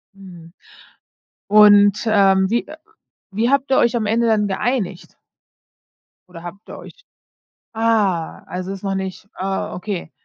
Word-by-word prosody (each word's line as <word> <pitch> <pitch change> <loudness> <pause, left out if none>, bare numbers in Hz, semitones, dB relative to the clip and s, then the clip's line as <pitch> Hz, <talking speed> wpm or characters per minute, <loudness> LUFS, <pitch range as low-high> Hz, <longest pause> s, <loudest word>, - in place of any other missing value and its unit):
Mhm, 175 -4 -14 1.0
und, 205 -1 +6
ähm, 195 -3 +3
wie, 235 +1 0
äh 310 - -11 0.6
wie 225 +5 0
habt 275 0 +1
ihr 265 - +3
euch 240 0 +2
am 220 - -2
Ende 230 +2 +1
dann 210 -2 +2
geeinigt? 195 -2 -3 1.1
Oder 170 -2 -12
habt 180 +4 -11
ihr - - -9
euch - - -14 0.7
ah, 215 -7 0
also, 185 +2 -5
ist 195 - -9
noch 195 -1 -2
nicht 190 +1 -6
ah, 190 +1 -4
okay. 180 -3 -5
200 Hz, 140 wpm, -19 LUFS, 190-225 Hz, 1.1 s, und